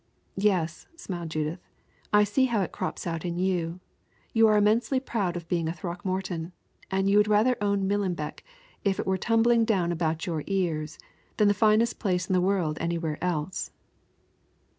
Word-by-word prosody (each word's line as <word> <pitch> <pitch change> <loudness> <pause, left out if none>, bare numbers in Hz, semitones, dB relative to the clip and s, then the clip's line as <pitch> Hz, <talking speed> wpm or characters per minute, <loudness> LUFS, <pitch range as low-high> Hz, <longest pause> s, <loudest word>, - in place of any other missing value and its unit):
"Yes," 180 -5 0
smiled 175 - -6
Judith; 155 +2 -2 0.5
"I 210 0 +6
see 210 +6 +2
how 235 -5 +1
it - - -5
crops - - -4
out 165 -2 -3
in 175 -1 -3
you. 180 -2 -1 0.5
You 225 -1 +6
are 215 -1 +4
immensely 225 +5 +3
proud 200 -9 -2
of 170 -1 -8
being 170 -1 0
a 165 - -1
Throckmorton, 175 0 -4 0.4
and 195 0 +1
you 200 +1 +4
would 210 0 +5
rather 215 +4 +4
own 200 -1 +1
Millenbeck, 190 -6 -2 0.4
if 195 -2 +1
it - - -1
were 190 0 0
tumbling 230 0 +3
down 190 -6 +1
about 165 -1 -1
your 160 -4 -2
ears, 165 -6 -1 0.4
than 210 -1 +5
the - - +4
finest 215 +2 +3
place 180 -3 0
in 190 - 0
the 180 - +3
world 180 -5 0
anywhere 165 -2 -2
else." 175 0 -2
185 Hz, 170 wpm, -27 LUFS, 170-210 Hz, 0.5 s, I